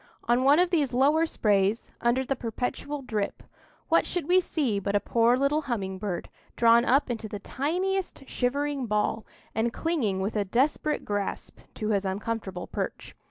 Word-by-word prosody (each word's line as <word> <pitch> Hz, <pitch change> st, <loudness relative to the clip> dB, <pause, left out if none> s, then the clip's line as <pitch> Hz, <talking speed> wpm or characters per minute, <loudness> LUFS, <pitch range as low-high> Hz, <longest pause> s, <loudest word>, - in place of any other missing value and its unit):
On 240 Hz, +2 st, +2 dB
one 280 Hz, +3 st, +6 dB
of 360 Hz, +1 st, +3 dB
these 290 Hz, -8 st, +1 dB
lower 300 Hz, +5 st, +4 dB
sprays, 205 Hz, -3 st, +1 dB
under 240 Hz, +3 st, +2 dB
the 270 Hz, -, 0 dB
perpetual 255 Hz, +4 st, -4 dB
drip, 215 Hz, -5 st, -3 dB, 0.4 s
what 330 Hz, -, +3 dB
should 355 Hz, -5 st, -3 dB
we 365 Hz, +1 st, +5 dB
see 280 Hz, -, -1 dB
but 200 Hz, +1 st, -2 dB
a -, -, +5 dB
poor 235 Hz, +3 st, +3 dB
little 280 Hz, +3 st, +2 dB
humming 190 Hz, -5 st, -2 dB
bird, 190 Hz, -4 st, -3 dB, 0.3 s
drawn 235 Hz, +1 st, +5 dB
up 270 Hz, 0 st, +3 dB
into 225 Hz, -2 st, -4 dB
the 210 Hz, -, -4 dB
tiniest 360 Hz, -, -2 dB
shivering 280 Hz, +1 st, -1 dB
ball, 210 Hz, +1 st, 0 dB, 0.3 s
and 230 Hz, +1 st, 0 dB
clinging 250 Hz, -, -1 dB
with 200 Hz, +4 st, -2 dB
a 210 Hz, -, +2 dB
desperate 270 Hz, +8 st, 0 dB
grasp 205 Hz, -1 st, -3 dB, 0.2 s
to 215 Hz, -2 st, -3 dB
his 200 Hz, -2 st, +1 dB
uncomfortable 195 Hz, -1 st, -3 dB
perch. -, -, -5 dB
240 Hz, 165 wpm, -27 LUFS, 210-290 Hz, 0.4 s, one